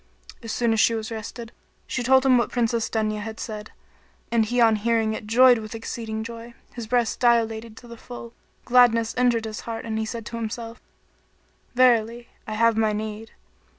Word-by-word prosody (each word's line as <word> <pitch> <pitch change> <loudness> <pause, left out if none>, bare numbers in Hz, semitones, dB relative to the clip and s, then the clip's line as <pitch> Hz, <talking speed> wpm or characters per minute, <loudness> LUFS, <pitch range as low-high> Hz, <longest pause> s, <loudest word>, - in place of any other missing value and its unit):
As 230 -2 -6
soon 235 +1 +1
as 220 - 0
she 230 - +4
was 220 0 -5
rested, 225 +1 -7 0.3
she 255 - -3
told 260 +2 +4
him 260 -1 +5
what 235 - 0
Princess 235 -2 0
Dunya 215 -1 -1
had 220 +1 -7
said; 215 -1 -7 0.6
and 230 -1 +3
he 245 +3 -1
on 225 -2 +5
hearing 225 0 +1
it 215 - -7
joyed 245 +2 +6
with 215 +1 -8
exceeding 225 -1 -5
joy; 230 +1 -9 0.2
his 235 -3 -7
breast 240 -1 0
dilated 225 -2 +1
to 240 - -13
the 235 0 -10
full; 235 0 -10 0.3
gladness 235 -2 +4
entered 240 -2 +2
his 215 0 -5
heart 225 -1 -6
and 220 -1 -3
he 220 - -1
said 230 -1 -6
to 230 - -6
himself, 230 +1 -6 0.9
"Verily, 235 -1 +3 0.2
I 215 - -4
have 230 0 +3
my 220 -1 +2
need." 215 +1 -5
230 Hz, 185 wpm, -24 LUFS, 220-235 Hz, 0.9 s, joyed